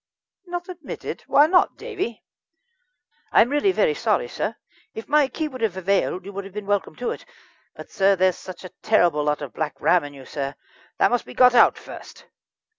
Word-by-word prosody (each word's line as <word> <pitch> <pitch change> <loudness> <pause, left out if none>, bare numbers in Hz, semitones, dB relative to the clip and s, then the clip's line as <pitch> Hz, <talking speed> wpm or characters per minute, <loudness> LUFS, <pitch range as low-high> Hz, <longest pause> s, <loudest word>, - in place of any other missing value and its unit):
"Not 350 +1 -5
admitted? 360 -3 -7
Why 290 - +6
not, 360 +3 +3
Davie?" 385 - -5 1.1
"I - - +7
really 290 - +1
am 375 - 0
very - - +3
sorry, 485 - 0
sir. - - -3 0.4
If 220 - -7
my 295 -1 +4
key 310 +4 -3
would 260 -4 -9
have 210 -5 -1
availed, 190 -1 0
you 200 - -8
would 200 +1 -5
have 195 0 -12
been 210 -1 -5
welcome 200 -5 -1
to 245 - -3
it; - - -7 0.5
but, - - -11
sir, 195 0 +3
there's 185 -1 +2
such 185 0 -10
a - - -7
terrible 175 -8 +3
lot 150 0 -1
of 140 - -8
Black 155 -1 -4
Ram 180 -3 +3
in 145 0 -9
you, 135 -1 -12
sir. 140 -1 -5 0.4
That - - +3
must 245 - 0
be - - -11
got 250 -1 +6
out 245 - +5
first." - - -12
205 Hz, 200 wpm, -23 LUFS, 180-295 Hz, 1.1 s, I